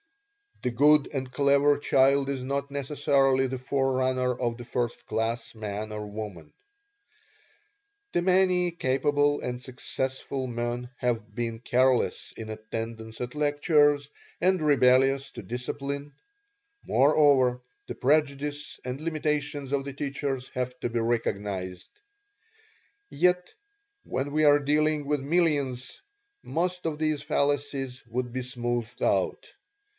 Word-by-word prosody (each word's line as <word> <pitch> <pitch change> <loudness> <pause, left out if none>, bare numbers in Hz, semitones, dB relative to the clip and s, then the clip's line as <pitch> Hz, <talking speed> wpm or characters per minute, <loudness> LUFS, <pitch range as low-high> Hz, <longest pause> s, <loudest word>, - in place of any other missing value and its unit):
"The 125 - 0
good 145 +4 +5
and 130 -3 -4
clever 140 +1 +4
child 140 0 +3
is 135 -2 -2
not 140 +1 -2
necessarily 135 -1 +2
the 130 0 -4
forerunner 130 -1 0
of 120 -1 -2
the 120 - -9
first 120 0 -2
class 115 +1 -2
man 105 0 -5
or 105 0 -5
woman; 105 -4 -7 1.6
and 175 - +1
many 185 -1 +3
capable 145 -1 +1
and 125 0 -4
successful 130 +1 -4
men 120 0 -3
have 115 -3 -2
been 115 -1 -3
careless 125 +1 +1
in 110 -1 -7
attendance 110 +1 -6
at 125 0 -4
lectures, 145 -1 +3 0.3
and 185 0 +2
rebellious 135 -1 +4
to 120 - -9
discipline. 140 +6 -4 0.7
Moreover, 135 -3 +4 0.3
the - - -5
prejudice 145 +1 0
and 130 +3 -4
limitations 150 -3 -2
of 140 -1 +1
the 140 0 -6
teachers 135 -2 -3
have 125 0 -4
to 120 - -2
be 120 0 -1
recognized. 100 -5 -2 1.2
Yet 180 +3 +1 0.5
when 135 +2 -3
we 155 +1 +2
are 145 0 +6
dealing 150 +1 +1
with 145 -1 0
millions 140 -5 0 0.4
most 180 +2 -2
of 155 -2 -3
these 155 -2 0
fallacies 140 -2 -1
would 120 +1 -3
be 130 +1 -3
smoothed 120 -1 -3
out. - - 0
135 Hz, 120 wpm, -27 LUFS, 120-145 Hz, 1.6 s, are